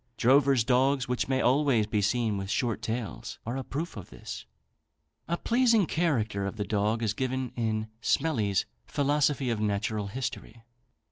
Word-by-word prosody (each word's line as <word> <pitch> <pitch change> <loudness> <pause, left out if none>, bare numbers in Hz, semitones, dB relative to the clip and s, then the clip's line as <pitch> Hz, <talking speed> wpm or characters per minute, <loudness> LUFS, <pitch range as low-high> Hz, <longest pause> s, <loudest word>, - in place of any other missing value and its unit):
Drovers' 135 0 +4
dogs, 130 +2 +2
which 125 0 -1
may 130 0 +1
always 130 -4 +3
be 105 0 0
seen 110 +1 +1
with 95 -1 -4
short 115 +1 0
tails, 115 -1 -4
are 120 +3 -3
a 135 - -3
proof 160 +7 -4
of 100 -4 -8
this. - - -8 0.8
A 170 - 0
pleasing 235 -3 +3
character 115 - 0
of 100 - -5
the 105 - -2
dog 110 +2 0
is 105 -2 +1
given 130 +1 -2
in 110 -2 -1
Smellie's 115 - +1 0.2
"Philosophy 145 -2 +1
of 115 - -1
Natural 105 0 -1
History." 115 0 -5
120 Hz, 155 wpm, -28 LUFS, 110-135 Hz, 0.8 s, Drovers